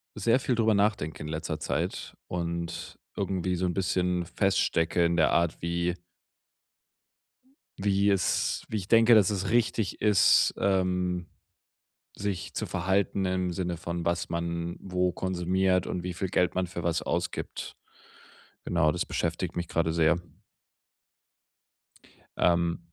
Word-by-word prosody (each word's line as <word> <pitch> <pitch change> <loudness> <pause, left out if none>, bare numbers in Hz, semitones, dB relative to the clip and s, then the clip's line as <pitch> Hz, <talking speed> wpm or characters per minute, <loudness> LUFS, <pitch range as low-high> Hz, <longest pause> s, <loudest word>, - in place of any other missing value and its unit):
sehr 115 +5 +2
viel 125 -1 0
drüber 110 -1 +3
nachdenke 100 -7 0
in - - -6
letzter 80 0 -3
Zeit - - -3
und 85 -1 -4 0.2
irgendwie 90 -1 -1
so 90 - -1
'n 90 - -1
bisschen 90 -2 0
feststecke 85 -2 +1
in 85 - +1
der 80 - +4
Art, 85 -1 +1
wie 85 +1 0 1.9
wie 100 0 +2
es 95 -3 0
wie 110 - -3
ich 95 - -7
denke, 115 +1 +6
dass 105 -5 +5
es 100 -1 -2
richtig 115 -4 0
ist, 105 -2 +4
ähm, 90 -2 0 0.9
sich 100 -3 -3
zu - - -3
verhalten 95 +2 0
im 90 -1 0
Sinne 85 -1 -2
von 85 0 -4
was 85 0 -1
man 85 0 -3
wo 90 -1 0
konsumiert 95 0 0
und 90 - -3
wie 90 0 -4
viel 95 +2 -3
Geld 90 0 +1
man 95 0 +1
für 85 0 -6
was 85 0 0
ausgibt. - - -3 0.9
Genau, 80 -3 +2
das - - -2
beschäftigt - - -2
mich 85 0 -3
grade 80 -1 0
sehr. 85 +1 +3 2.2
Ähm 85 -1 +2
90 Hz, 135 wpm, -28 LUFS, 85-95 Hz, 2.2 s, denke